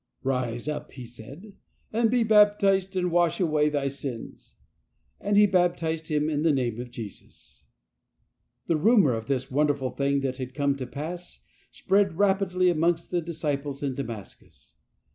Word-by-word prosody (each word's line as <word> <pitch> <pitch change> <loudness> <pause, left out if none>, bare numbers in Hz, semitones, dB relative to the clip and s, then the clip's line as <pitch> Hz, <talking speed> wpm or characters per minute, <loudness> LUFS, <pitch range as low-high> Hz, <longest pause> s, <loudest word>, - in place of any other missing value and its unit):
" - - -42
Rise 125 -2 -2
up," 150 0 -4
he 125 -3 -8
said, 135 - -12 0.2
" - - -39
and 225 0 +2
be 245 0 +2
baptized, 205 -3 +4
and 180 -1 0
wash 175 -1 +2
away 155 -4 +2
thy 145 -2 -1
sins." 135 -3 -7 0.6
And 205 0 0
he 210 - +8
baptized 170 -4 0
him 150 -1 0
in 150 -2 -1
the 160 0 +3
Name 120 -5 -1
of 125 - -8
Jesus. 115 -4 -11 1.0
The 165 - +1
rumour 190 - +4
of 110 -1 -4
this 135 -2 -2
wonderful 140 -2 +1
thing 140 0 0
that 130 -1 -2
had 130 -1 -6
come 140 -1 +1
to 130 -2 -5
pass 165 +7 -7 0.2
spread 195 -3 +1
rapidly 190 -2 +2
amongst 170 +1 0
the 175 -1 +1
disciples 145 -4 -3
in 135 -2 -1
Damascus. 110 - -9
150 Hz, 160 wpm, -26 LUFS, 135-180 Hz, 1.0 s, he